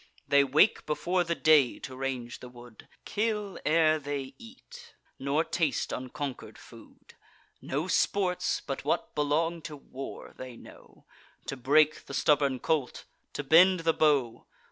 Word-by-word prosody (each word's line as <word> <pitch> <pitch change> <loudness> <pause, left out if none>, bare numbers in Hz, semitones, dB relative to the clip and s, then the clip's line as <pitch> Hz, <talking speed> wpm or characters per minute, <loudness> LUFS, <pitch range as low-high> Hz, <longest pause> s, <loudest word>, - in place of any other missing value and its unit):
They 140 0 +5
wake 150 +10 +3
before 175 +4 0
the 170 0 -2
day 150 -7 +4
to 130 - -9
range 130 -2 -4
the 125 - -10
wood, 120 -2 -15 0.2
Kill 210 -2 -2
ere 155 0 +3
they 140 -2 -5
eat, 470 - -14 0.2
nor 140 +4 +1
taste 160 -5 -1
unconquer'd 130 +1 -6
food. - - -16 0.5
No 150 +6 -3
sports, 185 -1 0
but - - -5
what - - -1
belong 160 +3 0
to 155 - -8
war, 135 -1 -9
they 130 -2 -9
know: - - -16 0.4
To - - -4
break 150 +4 +2
the 140 - -6
stubborn 140 -2 +2
colt, 140 0 -2 0.3
to 145 - -4
bend 180 +5 +5
the 165 0 +2
bow. 135 -8 +1
150 Hz, 145 wpm, -28 LUFS, 135-165 Hz, 0.5 s, They